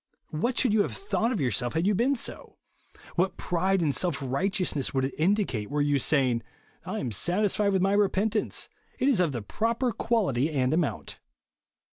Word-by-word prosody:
What 235 +12 -1
should 245 -5 +3
you 215 - +4
have - - -2
thought 250 - -1
of 230 - -1
yourself 125 -2 0
had 160 +2 0
you 210 - +3
been 245 +8 +2
so 235 - -6 0.4
1 - - -22
What 185 +2 +1
pride 185 +2 0
and 145 -3 +1
self 175 -6 +1
righteousness 145 +1 -1
would 130 0 +2
it 135 - -4
indicate, 160 - 0
were 145 +1 -1
you 145 -1 +2
saying, 130 -4 +2 0.2
" - - -34
I - - -3
am 120 - -3
satisfied 200 - +1
with 190 -1 +1
my 195 +1 +2
repentance, 205 +1 +1 0.2
— - - -36
it 265 - +2
is 265 -9 +3
of 175 -4 +2
the 120 -5 -4
proper 230 - -1
quality 190 - 0
and 135 -3 0
amount." 160 -3 -2
180 Hz, 195 wpm, -27 LUFS, 140-210 Hz, 0.4 s, you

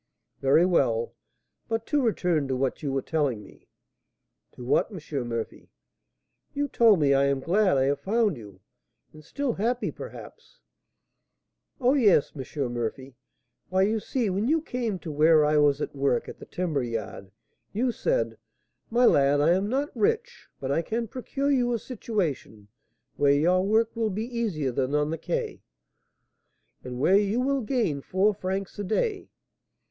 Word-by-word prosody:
"Very 135 +6 +4
well. 120 -10 +1 0.6
But 225 0 -2
to 295 -2 +1
return 180 - +1
to 130 - -1
what 130 0 -1
you 145 -3 -2
were 135 -1 -1
telling 140 -9 -1
me - - -18 0.4
" - - -55
"To 125 - -10
what, 125 - +2
M. 150 -9 -5
Murphy?" 115 -1 -5 0.9
"You 290 0 0
told 225 -6 +5
me, 140 -2 +3
I 135 0 +3
am 140 -1 +1
glad 185 +3 +2
I 130 - +3
have 140 +1 +1
found 215 -2 +1
you, 100 -6 -13 0.5
and 155 0 -14
still 275 - -2
happy, 235 +5 -1
perhaps - - -11 0.6
" - - -53
"Oh, 255 0 +3
yes, 210 - +4
M. 135 -2 -4
Murphy! 125 +3 -4 0.5
Why, 185 +1 +2
you 215 +3 +1
see, 240 +2 -2
when 200 +5 -1
you 320 +4 +3
came 240 -9 -3
to 160 -2 -7
where 155 +1 +5
I 150 0 +2
was 145 0 +3
at - - -4
work 135 -3 0
at - - -9
the - - -11
timber 165 -6 -2
yard, 115 -5 -5 0.4
you 245 +4 0
said, - - -1 0.5
'My 245 +2 +3
lad, 140 -6 +4
I 150 +3 +4
am 190 +3 +1
not 275 +4 -2
rich, 440 +1 -1
but 135 0 -3
I 155 - +2
can 230 +6 -3
procure 275 +4 -2
you 245 -3 +2
a - - +1
situation 180 - -4 0.5
where 140 -1 +4
your 175 +6 +3
work 220 +3 +1
will 225 -1 0
be 210 +3 -3
easier 215 - -2
than 130 +3 -1
on 150 +1 +1
the 165 - -3
Quai, - - -3 1.2
and 125 -1 -6
where 185 +8 +4
you 205 +3 0
will 270 +1 +1
gain 215 - -1
four 195 +7 +1
francs 195 0 -4
a - - -2
day.' 385 - -1
180 Hz, 170 wpm, -26 LUFS, 140-230 Hz, 1.2 s, told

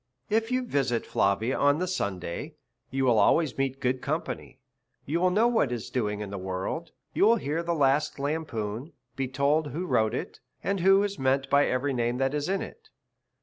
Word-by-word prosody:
If 225 +1 +2
you 255 0 0
visit 135 - 0
Flavia 105 +6 +1
on 145 +1 +4
the 180 - -1
Sunday, 95 - -3 0.3
you 135 +1 0
will 120 -4 +4
always 150 +7 +3
meet 135 0 -1
good 130 -1 0
company, 155 -2 -4 0.5
you 160 +5 0
will 185 +1 +3
know 215 +6 +3
what 225 - +2
is 120 -2 -4
doing 105 -4 -1
in 100 -2 -5
the 100 - -4
world, 95 - -4 0.2
you - - +2
will 225 +3 +6
hear 160 -5 -2
the 170 0 -1
last 145 0 +2
lampoon, 140 -3 -3 0.2
be 135 -1 -1
told 140 +4 +1
who 165 +5 -4
wrote 110 -8 +1
it, - - -5 0.2
and 195 0 0
who 195 +3 +5
is 200 -1 -3
meant 135 +1 +1
by 140 0 +5
every 130 +2 0
name 120 0 0
that 135 +1 0
is 150 +2 -1
in 195 0 0
it. 470 - -12
140 Hz, 195 wpm, -27 LUFS, 120-170 Hz, 0.5 s, will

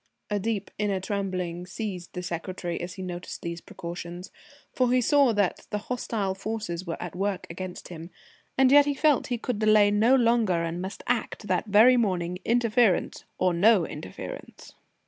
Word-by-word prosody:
A 205 - +1
deep 210 -1 -2
inner 205 -2 0
trembling 185 -3 -3
seized 185 -3 -6
the 180 - -5
secretary 175 0 -4
as 180 +1 -6
he 190 - -6
noticed 180 -1 -6
these 170 0 -5
precautions, 175 0 -8 0.4
for 250 -1 +2
he 255 - +4
saw 275 +1 +4
that 205 -3 0
the 210 - -1
hostile 210 -3 -2
forces 195 -3 -4
were 165 - -4
at - - -6
work 195 0 -2
against 180 +1 -7
him, 165 -1 -8 0.5
and 265 -1 +5
yet 290 0 +8
he 285 - 0
felt 300 -2 +3
he 245 - -1
could 230 -1 -3
delay 215 -1 +5
no 220 +5 +4
longer 230 -8 +2
and 170 +1 -3
must 190 +2 -6
act 235 -2 -2
that 220 - 0
very 220 +5 +6
morning, 180 -5 0
interference 230 -4 +2
or 185 -1 +2
no 190 +1 +4
interference. 120 -13 -9
200 Hz, 170 wpm, -27 LUFS, 180-230 Hz, 0.5 s, yet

